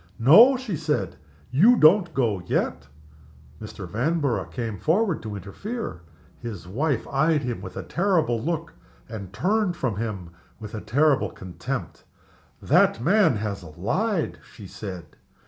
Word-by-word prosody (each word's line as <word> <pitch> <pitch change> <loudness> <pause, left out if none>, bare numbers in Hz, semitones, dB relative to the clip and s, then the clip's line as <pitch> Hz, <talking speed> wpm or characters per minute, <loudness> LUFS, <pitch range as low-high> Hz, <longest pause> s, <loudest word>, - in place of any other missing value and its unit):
"No!" 220 - +7
she 245 -8 -4
said. 150 - -2 0.4
"You 200 - +6
don't 170 +2 +5
go 110 -8 +1
yet!" 65 +2 -1 0.7
Mr. 105 -3 -8
Vanborough 125 - 0
came 115 -6 -5
forward 180 - +1
to 110 -2 -6
interfere. 105 - -6 0.4
His 110 -7 -7
wife 135 - -1
eyed 150 +1 +1
him 120 -2 -3
with - - -9
a - - -4
terrible 165 - +1
look, 165 +4 -3 0.3
and 100 -5 -8
turned 185 - 0
from 115 -7 -2
him 100 -6 -4 0.3
with 105 -2 -9
a 110 - -5
terrible 140 +6 +2
contempt. 95 - -6 0.6
"That - - +3
man 170 - +3
has 105 -1 -3
lied!" 135 - -2
she 105 - -12
said. 95 -2 -7
125 Hz, 135 wpm, -24 LUFS, 105-170 Hz, 0.7 s, No